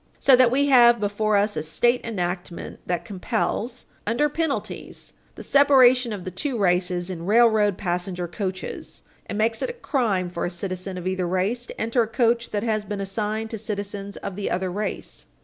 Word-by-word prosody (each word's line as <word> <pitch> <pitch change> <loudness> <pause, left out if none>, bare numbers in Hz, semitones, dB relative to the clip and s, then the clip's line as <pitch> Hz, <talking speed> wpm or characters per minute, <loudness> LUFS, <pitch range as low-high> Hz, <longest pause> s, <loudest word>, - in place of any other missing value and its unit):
So 270 - +6
that 250 -1 +5
we 275 +4 +2
have 240 -3 +7
before 210 +1 +1
us 205 +1 +1
a - - -1
state 240 +11 +1
enactment 180 -5 -4
that 175 -2 -2
compels, 225 +3 -3 0.2
under 285 +7 +2
penalties, 315 -1 -4 0.2
the - - -9
separation 260 -3 +5
of 200 -4 -6
the 185 - -4
two 250 - -3
races 180 -2 +1
in 170 -1 -6
railroad 215 -3 +4
passenger 180 -1 -3
coaches, 185 +1 -5 0.2
and 205 - -4
makes 225 +1 +1
it - - -1
a - - -4
crime 220 - -1
for 170 - -4
a - - 0
citizen 185 +1 -4
of 180 - -6
either 185 -1 -1
race 200 +7 -1
to - - -10
enter 230 +2 +1
a 225 - 0
coach 235 0 +1
that 205 0 -2
has 215 -2 0
been 205 -1 -5
assigned 215 +3 -3
to 225 - -4
citizens 200 -1 -5
of 190 - -6
the 200 0 -3
other 185 0 -1
race. 210 +3 -4
210 Hz, 185 wpm, -24 LUFS, 185-235 Hz, 0.2 s, have